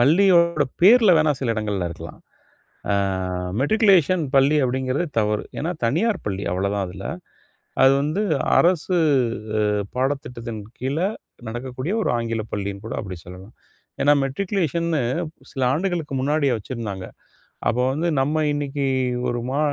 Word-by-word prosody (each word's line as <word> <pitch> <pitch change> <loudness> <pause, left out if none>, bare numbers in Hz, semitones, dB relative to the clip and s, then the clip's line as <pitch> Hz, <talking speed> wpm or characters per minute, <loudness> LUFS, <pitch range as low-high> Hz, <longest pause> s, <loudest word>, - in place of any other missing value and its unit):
பள்ளியோட 170 +2 +4 0.2
பேருல 215 -2 +7
வேணா 155 -1 +3
சில 125 -4 0
இடங்கள்ல 105 -5 -2
இருக்கலாம். 85 - -9 0.7
ஆ - - +3 0.7
மெட்ரிகுலேஷன் 185 -1 +4
பள்ளி 140 +3 +5
அப்டிங்கிறது 130 +5 -1
தவறு. 105 -1 0
ஏன்னா 160 - -2
தனியார் 185 - +1
பள்ளி 100 -1 -2
அவ்ளோதான் 100 +2 -1
அதுல. 95 +2 -9 0.8
அது 135 0 +7
வந்து 155 +8 -1 0.4
அரசு 180 +1 +2 1.0
பாடத்திட்டத்தின் 125 -4 -3 0.2
கீழ 130 +3 -2 0.5
நடக்கக்கூடிய 130 - -4
ஒரு - - 0
ஆங்கில 115 -1 -2
பள்ளின்னு 100 0 -4
கூட 115 - -5
அப்டி 95 -3 -7
சொல்லலாம். 90 +4 -12 0.5
ஏன்னா 145 - +5
மெட்ரிகுலேஷன்னு 170 0 -1 0.5
சில 135 - -4
ஆண்டுகளுக்கு 170 -3 -2
முன்னாடிய 145 +1 +1
வச்சிருந்தாங்க. 105 -4 -6 0.6
அப்போ 125 - +1
வந்து 155 +6 -1
நம்ம 150 +4 +1
இன்னைக்கு 145 -1 -2 0.4
ஒரு 120 - -1
மா 135 +2 -1
135 Hz, 120 wpm, -22 LUFS, 115-165 Hz, 1.0 s, பேருல